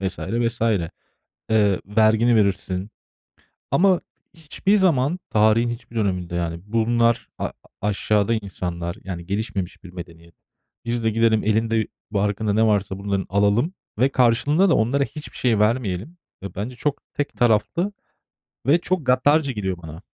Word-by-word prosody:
vs. 95 -1 -3
vs. 115 +3 -2
Eee, 100 -8 -1 0.7
vergini 110 +3 +3
verirsin 95 -1 0 0.8
ama 185 -1 +4 0.4
hiçbir 170 +6 0
zaman 170 -3 +2
tarihin 110 +2 +3
hiçbir 120 0 -8
döneminde, 90 -5 -1
yani, 85 -1 -2
bunlar 115 +1 +1
a - - -2 0.3
aşağıda 105 +2 +1
insanlar, 90 -4 -4
yani, 85 -3 -6
gelişmemiş 100 -3 -4
bir 90 - -10
medeniyet. 85 -2 -11 0.5
Biz 120 -1 -2
de 110 - +3
gidelim 110 0 +2
elinde 110 +1 +1 0.2
barkında 105 +1 0
ne 110 +2 +3
varsa 100 -2 0
bunların 100 -1 -2
alalım 105 - +2 0.2
ve 130 - +4
karşılığında 135 +9 +3
da - - +4
onlara 135 +5 +2
hiçbir 150 +1 -9
şey 120 -4 +1
vermeyelim. 110 - 0 0.3
E, 100 -2 -7
bence 115 +6 -5
çok 145 +2 -2
tek 145 - -2
taraflı 120 - +1 0.8
ve 150 +5 +6
çok 180 -5 -2
gaddarca 140 +3 +3
geliyor 95 -5 -3
bana. 80 +2 -9
110 Hz, 135 wpm, -22 LUFS, 100-125 Hz, 0.8 s, ve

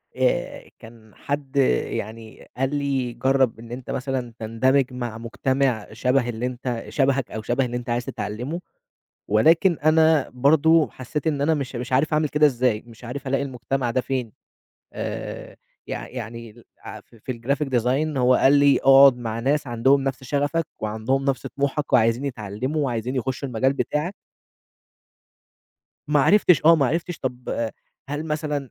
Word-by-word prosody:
آآ، - - -1
كان 110 -1 -15
حد 140 -1 -5 0.3
يعني 110 +1 -7
قال 135 +2 0
لي 135 -4 -1
جرّب 130 0 +1
إن 115 0 -11
أنت 125 +1 -8
مثلًا 130 -2 -3
تندمج 125 +4 +1
مع 120 -3 -5
مجتمع 125 0 -1
شبه 125 +1 +1
اللي 120 +1 -3
أنت 125 -1 -4
شبهك 135 -2 0
أو 110 - -5
شبه 120 +4 0
اللي 120 0 -3
أنت 120 -1 -7
عايز 120 +1 -1
تتعلمه 125 +11 -4 0.7
ولكن 160 - +4
أنا 160 -1 +4
برضه 155 +5 +4
حسّيت 150 +5 -5
إن 145 -3 0
أنا 155 +3 +3
مش 140 -4 -4
مش 125 +1 -4
عارف 150 +4 +2
أعمل 150 -1 +1
كده 150 0 +3
ازاي، 125 -5 +1
مش 115 0 -15
عارف 135 +3 -6
ألاقي 135 +1 0
المجتمع 125 -1 -2
ده 130 - +1
فين، 125 -4 -3 0.6
آآ، - - -6 0.3
يع - - -5
يعني 115 -2 -7
ال 115 +2 -18 0.2
عف - - -11
في 115 +3 -6
الGraphic 135 +5 -2
Design 135 +6 0
هو 125 0 +4
قال 135 - +4
لي 140 -1 +5
اقعد 135 -1 +7
مع 115 -2 -4
ناس 145 +4 0
عندهم 130 +4 +3
نفْس 135 0 -3
شغفَك، 145 +4 0
وعندهم 110 +6 -1
نفْس 135 -2 -1
طموحَك، 140 +1 -2
وعايزين 115 +2 +3
يتعلموا، 130 +4 -3
وعايزين 125 0 -2
يخشوا 130 +2 -3
المجال 130 +3 +1
بتاعَك. 150 +6 -2 1.9
ما 150 -1 +3
عرفتش، 180 0 +4
آه، 165 +1 +7
ما 140 -4 +2
عرفتش 165 +4 -2
طَب 125 -3 -3 0.4
هل 145 +2 -3
مثلًا، 150 -4 -3
130 Hz, 155 wpm, -23 LUFS, 120-145 Hz, 1.9 s, اقعد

